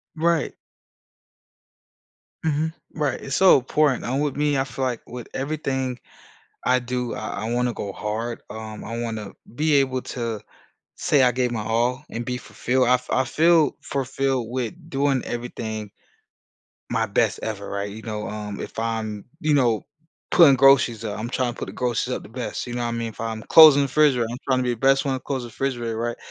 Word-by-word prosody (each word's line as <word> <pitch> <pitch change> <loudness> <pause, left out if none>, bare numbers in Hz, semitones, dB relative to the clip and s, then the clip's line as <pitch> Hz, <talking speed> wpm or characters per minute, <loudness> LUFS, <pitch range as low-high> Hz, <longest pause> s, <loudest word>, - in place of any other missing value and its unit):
Right. 165 0 +1 1.9
Mhm. 155 +1 +1 0.2
Right, 150 -3 -1
it's 135 - -3
so 190 -1 +7
important, 135 0 +1
and 130 +4 0
with 145 - -1
me, 150 -1 +2
I 135 - +2
feel 130 0 -3
like 125 -2 -2
with 125 -2 -8
everything 135 -3 -2 0.7
I 125 0 +4
do, 125 0 -3
I 110 0 -4
I 115 - -2
wanna 125 0 +1
go 100 - -5
hard, 110 +4 -4
um, 110 0 -7
I 115 - -5
wanna 110 -3 -4 0.2
be 150 +4 +1
able 130 -2 +2
to 115 -3 -2 0.6
say 145 -3 +3
I 125 - +5
gave 125 0 0
my 110 -3 -2
all, 120 +5 0
and 115 +1 -4
be 125 0 -2
fulfilled 125 +3 0
I 125 - +6
f 125 0 -2
I 130 - +2
feel 160 +2 +4
fulfilled 135 -3 -1
with 125 +1 -2 0.2
doing 135 -2 +1
everything 110 -3 -5 1.0
my 115 0 +1
best 110 +1 +1
ever, 100 -2 -4
right? 100 0 -3
You 110 +2 -9
know? 105 -2 -4
Um, 105 -1 -5
if - - -8
I'm, 110 -2 -2 0.2
you 155 -3 +2
know, 120 -6 +2 0.4
putting 150 -7 +7
groceries 135 -4 +5
up 105 -1 -4
I'm 115 - -3
trying 125 -2 0
to - - -18
put - - -4
the - - -8
groceries 125 0 -1
up - - -8
the - - -12
best, 120 +3 -5
you 120 - -5
know 120 - -2
what 120 - -1
I 115 - -3
mean? 115 0 -2
If 110 - -11
I'm 110 -1 -3
closing 155 -3 +9
the 140 - +1
refrigerator, 135 -5 +3
I'm 120 - -4
trying 130 -1 +2
to 130 - +1
be 125 -1 +1
the - - -12
best 135 +4 +3
one 135 - +1
to 130 - -3
close 130 -1 -3
the 120 - -7
refrigerator, 120 -3 -3
right? 120 +1 -2
125 Hz, 200 wpm, -23 LUFS, 115-135 Hz, 1.9 s, closing